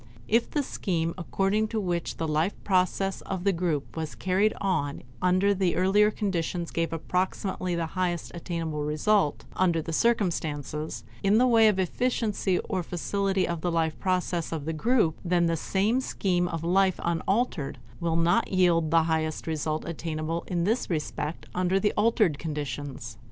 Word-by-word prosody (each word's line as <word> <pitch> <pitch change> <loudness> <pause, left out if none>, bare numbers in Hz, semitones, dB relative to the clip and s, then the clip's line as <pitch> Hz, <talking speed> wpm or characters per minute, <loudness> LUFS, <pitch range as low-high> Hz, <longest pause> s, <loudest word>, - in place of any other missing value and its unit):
If 230 +2 +2
the 295 - 0
scheme 165 -9 -2
according 195 +4 0
to 220 0 -2
which 175 -4 -2
the 165 - -2
life 155 +5 +1
process 195 0 +1
of 190 -2 -4
the 200 0 +3
group 165 -5 -2
was 160 -2 -4
carried 195 +3 +2
on 160 -8 -1 0.2
under 185 +2 +3
the 185 -2 +1
earlier 200 +3 +4
conditions 175 -4 -2
gave 165 -1 -1
approximately 180 +2 -1
the 170 -1 -1
highest 180 -3 -1
attainable 165 -3 -3
result 150 +3 +1
under 175 -3 +2
the 160 +1 -4
circumstances 155 - -1 0.2
in 200 +2 +4
the 250 - +5
way 230 -3 +6
of 210 -3 +3
efficiency 210 -1 0
or 185 - -1
facility 190 +3 -1
of 170 -2 -3
the 175 - 0
life 160 -1 0
process 180 -2 -1
of 155 -3 -4
the 160 - -2
group; 195 0 +2
then 175 -1 +2
the 165 0 +1
same 205 - +1
scheme 180 -7 0
of 165 -2 -4
life 185 +2 +2
unaltered 170 - 0 0.2
will 170 -1 0
not 165 +1 +2
yield 175 -4 +3
the 165 0 +4
highest 160 -1 -1
result 155 -1 -2
attainable 165 0 -3
in 175 -2 0
this 225 +7 0
respect 150 -1 -3
under 185 +1 +1
the 210 +1 +1
altered 210 - +2
conditions. 145 -5 -5
175 Hz, 160 wpm, -27 LUFS, 160-195 Hz, 0.2 s, way